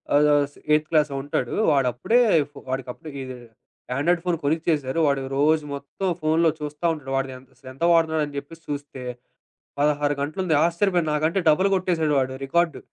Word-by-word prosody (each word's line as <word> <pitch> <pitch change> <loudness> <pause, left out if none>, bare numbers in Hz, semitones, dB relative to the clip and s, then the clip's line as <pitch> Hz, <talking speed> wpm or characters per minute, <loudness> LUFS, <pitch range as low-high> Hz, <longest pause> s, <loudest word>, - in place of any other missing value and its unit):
ఆహ్, 150 +1 +5
ఆస్ 145 0 0 0.2
ఎయితు 150 0 +4
క్లాసో 150 -3 +2
ఉంటాడు. 135 -3 -2 0.2
వాడప్పుడే, 135 - +2 0.5
వాడికప్పుడు 130 +3 -5
ఇదే 130 -1 -7 0.6
ఆండ్రాయిడ్ 170 +4 +2
ఫోన్ 175 -2 +1
కొనిచ్చేసారు. 155 -1 0
వాడు 140 -1 +1 0.2
రోజు 155 +2 +3
మొత్తం 140 +7 -5
ఫోనులో 160 +1 +3
చూస్తా 150 +2 -5
ఉంటాడు. 135 -4 -8
వాడిదెంత 130 -1 -5
అసలు 130 - -12
ఎంత 135 +6 -7
వాడుతున్నాడు 160 -2 +2
అని 145 - -11
చెప్పేసి 165 +4 -14
చూస్తే, 145 -2 -5 0.8
16 145 0 +2
గంటలుంది. 155 +4 -1
ఆశ్చర్యపోయాను. 175 -1 +1
నాకంటే 155 +5 +1
డబుల్ 185 +6 +4
కొట్టేసాడు 170 -5 0
వాడు 130 0 -1
రికార్డు. 170 +3 +1
150 Hz, 150 wpm, -24 LUFS, 140-165 Hz, 0.8 s, ఆహ్